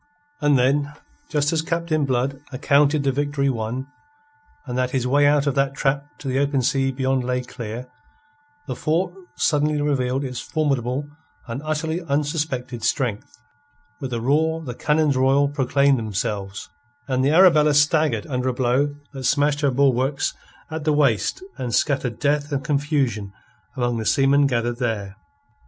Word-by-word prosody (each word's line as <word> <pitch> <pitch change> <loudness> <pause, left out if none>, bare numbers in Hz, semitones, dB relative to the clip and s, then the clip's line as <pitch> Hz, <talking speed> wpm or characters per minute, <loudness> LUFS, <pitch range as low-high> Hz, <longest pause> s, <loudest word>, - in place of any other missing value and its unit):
And 145 -2 +4
then, 140 +3 +1 0.4
just 150 0 +1
as 160 - +1
Captain 165 -2 -1
Blood 135 +1 -1
accounted 140 +2 +2
the 135 - +2
victory 140 0 0
won, 120 +2 -3 0.8
and 125 -3 -5
that 125 0 0
his 130 -1 -1
way 145 +3 +4
out 145 0 +3
of 140 - +1
that 135 0 0
trap 140 0 0
to 140 - -8
the 130 +1 0
open 140 -2 +1
sea 135 0 +1
beyond 130 0 0
lay 125 0 -1
clear, 120 0 -7 0.8
the - - -4
fort 175 +3 0 0.2
suddenly 150 0 +1
revealed 135 -2 0
its 125 -2 -4
formidable 140 -3 -1 0.4
and 120 +3 -5
utterly 160 +2 -2
unsuspected 145 -5 -2
strength. 120 -7 -2 0.6
With 135 -2 -5
a 120 - -1
roar 160 +5 +1
the 125 -5 -5
cannons 150 +2 +1
royal 135 +2 +3
proclaimed 140 -1 +2
themselves, 100 -2 -4 0.4
and 130 -1 0
the 135 - +3
Arabella 155 -3 +5
staggered 155 +1 +3
under 130 -4 -1
a - - -1
blow 130 +4 +1 0.2
that 135 -2 -6
smashed 145 +1 +2
her 140 - +3
bulwarks 135 +1 +1 0.4
at 160 -1 -4
the 155 0 +2
waist 140 - +1 0.2
and 120 -2 -1
scattered 130 -6 0
death 145 +1 0
and 140 -1 -1
confusion 140 -9 -1 0.4
among 120 -1 0
the 110 - -3
seamen 140 0 +4
gathered 120 -2 -1
there. 105 -5 -2
140 Hz, 155 wpm, -22 LUFS, 125-150 Hz, 0.8 s, Arabella